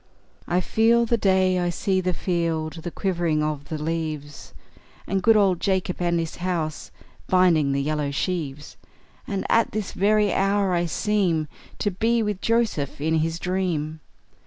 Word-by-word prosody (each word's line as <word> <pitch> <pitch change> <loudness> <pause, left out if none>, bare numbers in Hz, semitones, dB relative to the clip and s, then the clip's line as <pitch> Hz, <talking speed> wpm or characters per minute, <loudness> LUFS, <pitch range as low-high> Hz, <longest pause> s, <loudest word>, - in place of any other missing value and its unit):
I 180 +1 +1
feel 230 +4 +3
the 235 - +2
day; 190 -3 +2
I 175 0 0
see 190 +2 0
the 180 0 0
field; 165 -3 -1
The 175 - -4
quivering 170 -5 0
of 150 -2 -3
the 155 +1 -4
leaves; 155 -2 -4 0.5
And 195 0 -1
good 225 +3 +5
old 190 -4 +3
Jacob, 190 -2 0
and 170 -1 +1
his 165 -1 -4
house, 170 -4 -3 0.4
Binding 170 -6 +4
the 140 0 0
yellow 150 -1 -1
sheaves! 150 -1 -3 0.5
And 195 -3 -3
at 230 0 +2
this 210 -2 -3
very 210 +1 +2
hour 195 -1 +1
I 175 0 +1
seem 180 -5 0 0.3
To 205 - -1
be 225 +5 +1
with 210 -3 -3
Joseph 225 - 0
in 160 +2 +1
his 165 +1 -1
dream! 175 -4 -2
180 Hz, 160 wpm, -24 LUFS, 155-195 Hz, 0.5 s, good